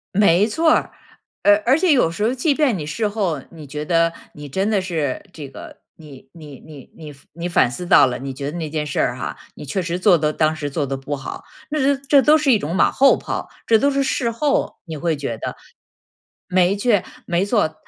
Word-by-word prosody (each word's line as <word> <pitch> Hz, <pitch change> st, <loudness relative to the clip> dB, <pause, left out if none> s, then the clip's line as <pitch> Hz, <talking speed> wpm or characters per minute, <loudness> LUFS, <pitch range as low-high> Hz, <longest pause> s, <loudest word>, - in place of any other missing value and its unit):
没 200 Hz, -1 st, +4 dB
错 320 Hz, +8 st, +1 dB
儿， -, -, 0 dB, 0.5 s
而 205 Hz, 0 st, +5 dB
而 260 Hz, +4 st, +4 dB
且 365 Hz, -1 st, +3 dB
有 250 Hz, -, +3 dB
时 185 Hz, +5 st, -4 dB
候 230 Hz, +3 st, +1 dB
即 285 Hz, +4 st, +1 dB
便 275 Hz, -7 st, +1 dB
你 155 Hz, -, -5 dB
事 210 Hz, +9 st, -2 dB
后 195 Hz, -9 st, -2 dB
你 160 Hz, -3 st, -12 dB
觉 150 Hz, +2 st, -6 dB
得 165 Hz, +1 st, +2 dB, 0.2 s
你 145 Hz, 0 st, -9 dB
真 190 Hz, +9 st, -1 dB
的 210 Hz, -2 st, +2 dB
是 160 Hz, -8 st, -3 dB
这 145 Hz, -4 st, -8 dB
个， -, -, -11 dB, 0.2 s
你 140 Hz, -4 st, -14 dB
你 150 Hz, -5 st, -12 dB
你 150 Hz, -4 st, -14 dB
你 -, -, -16 dB
反 135 Hz, -2 st, -19 dB
你 170 Hz, +2 st, -5 dB
反 170 Hz, -, +3 dB
思 175 Hz, +7 st, -6 dB
到 -, -, +7 dB
了， 125 Hz, -1 st, -3 dB
你 135 Hz, 0 st, -5 dB
觉 140 Hz, +2 st, -5 dB
得 170 Hz, -, -6 dB
那 160 Hz, -2 st, -4 dB
件 150 Hz, 0 st, -3 dB
事 145 Hz, -, -3 dB
儿 -, -, 0 dB
哈， -, -, -5 dB, 0.2 s
你 -, -, -9 dB
确 150 Hz, +7 st, -2 dB
实 170 Hz, 0 st, -3 dB
做 185 Hz, 0 st, +4 dB
得 150 Hz, 0 st, +1 dB
当 155 Hz, +1 st, +1 dB
时 145 Hz, -2 st, -4 dB
做 145 Hz, +1 st, -2 dB
得 135 Hz, 0 st, -3 dB
不 135 Hz, +2 st, -4 dB
好， 135 Hz, -, -8 dB, 0.3 s
那 285 Hz, -2 st, +2 dB
它 -, -, -12 dB
这 280 Hz, -1 st, +6 dB
都 300 Hz, +4 st, +5 dB
是 300 Hz, -3 st, +2 dB
一 225 Hz, -, +4 dB
种 165 Hz, +2 st, -4 dB
马 -, -, +3 dB
后 275 Hz, 0 st, +4 dB
炮。 -, -, -5 dB, 0.2 s
这 225 Hz, -1 st, +4 dB
都 280 Hz, -, +3 dB
是 275 Hz, 0 st, 0 dB
事 265 Hz, -2 st, -1 dB
后 280 Hz, +5 st, -1 dB
你 160 Hz, -3 st, -7 dB
会 165 Hz, +1 st, -1 dB
觉 130 Hz, -5 st, -4 dB
得。 -, -, -5 dB, 0.9 s
没 185 Hz, +1 st, +2 dB
错 205 Hz, -2 st, +2 dB, 0.2 s
没 175 Hz, +2 st, +1 dB
错， 205 Hz, -7 st, 0 dB
170 Hz, 250 characters per minute, -20 LUFS, 150-225 Hz, 0.9 s, 到